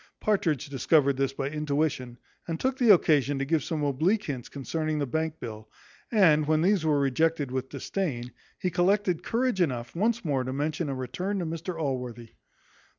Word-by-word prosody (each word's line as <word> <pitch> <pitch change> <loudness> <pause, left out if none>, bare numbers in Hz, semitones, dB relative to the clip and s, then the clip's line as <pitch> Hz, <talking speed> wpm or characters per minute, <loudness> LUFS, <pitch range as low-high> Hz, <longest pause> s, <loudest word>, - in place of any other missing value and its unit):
Partridge 190 - 0
discovered 140 +1 +2
this 135 -1 +1
by 135 0 -3
intuition, 145 -5 -1 0.3
and 165 -1 -3
took 260 +1 -1
the 240 -4 +6
occasion 145 -6 +4
to 135 - -1
give 155 0 +1
some 155 -3 -2
oblique 160 +10 +1
hints 135 - -5
concerning 155 +3 -2
the 145 - 0
bank 160 +4 -2
bill; 110 -2 -8 0.4
and, 160 -9 +4
when 155 0 +3
these 190 -2 +3
were 150 -2 +2
rejected 145 +1 +1
with 130 0 -3
disdain, 130 -12 -3 0.3
he 180 - -2
collected 180 0 +2
courage 240 -4 0
enough 120 -6 -1
once 225 +4 0
more 135 -4 +1
to 130 +1 -4
mention 150 +2 -2
a 135 - -2
return 180 +11 -3
to 180 - -2
Mr 165 +2 -4
Allworthy. 125 -5 -3
155 Hz, 175 wpm, -27 LUFS, 135-175 Hz, 0.4 s, the